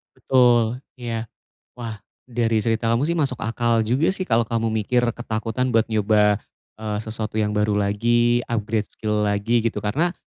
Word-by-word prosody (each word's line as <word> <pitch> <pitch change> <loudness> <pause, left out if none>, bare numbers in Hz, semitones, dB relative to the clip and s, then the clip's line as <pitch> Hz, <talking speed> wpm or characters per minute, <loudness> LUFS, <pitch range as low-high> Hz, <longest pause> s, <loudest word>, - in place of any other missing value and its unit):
Betul, 120 -1 +3 0.2
iya. 115 -2 -3 0.5
Wah 115 -3 -6 0.3
dari 115 -2 +1
cerita 115 +1 0
kamu 115 +3 +2
sih 170 - 0
masuk 135 -5 0
akal 115 0 +1
juga 130 +9 +1
sih 190 - -2
kalau 115 -8 +1
kamu 115 -1 -1
mikir 110 +3 +1
ketakutan 115 +2 -3
buat 115 - +5
nyoba, 105 -1 +3 0.4
eee, 105 -1 -3
sesuatu 110 0 -4
yang 105 - 0
baru 105 0 +1
lagi, 120 +4 +2
upgrade 110 -2 -1
skill 105 -1 -2
lagi 105 +4 +1
gitu, 110 -3 -1
karena 160 - 0
115 Hz, 155 wpm, -22 LUFS, 105-120 Hz, 0.5 s, buat